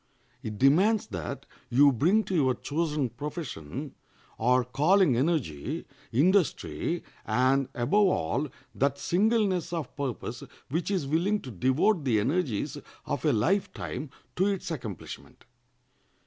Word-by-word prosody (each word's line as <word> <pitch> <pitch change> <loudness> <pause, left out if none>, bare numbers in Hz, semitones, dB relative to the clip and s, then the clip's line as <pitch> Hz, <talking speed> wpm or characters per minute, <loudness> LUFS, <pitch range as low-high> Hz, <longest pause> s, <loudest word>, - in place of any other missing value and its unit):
It 110 -5 -5
demands 190 - +4
that 85 -6 -5 0.2
you 140 +4 +6
bring 175 - +3
to 190 - -5
your 135 -7 +3
chosen 150 0 -1
profession 135 - -6 0.5
or 125 +2 +3
calling 150 +4 +3
energy, 130 - -1 0.3
industry, 175 - +1 0.2
and, 130 +4 +2
above 195 +12 +3
all, 140 - 0 0.3
that 140 +1 +1
singleness 190 +3 +1
of 165 -6 -4
purpose 140 -5 -4 0.3
which 165 +7 -1
is 190 -7 0
willing 175 +9 +1
to 130 - -8
devote 130 - +2
the 120 -6 +2
energies 130 - -1 0.3
of - - -3
a - - +4
life 185 - +1
time 150 - -5 0.3
to 190 +2 +3
its 195 -4 -2
accomplishment. 115 - -7
145 Hz, 125 wpm, -28 LUFS, 125-180 Hz, 0.5 s, you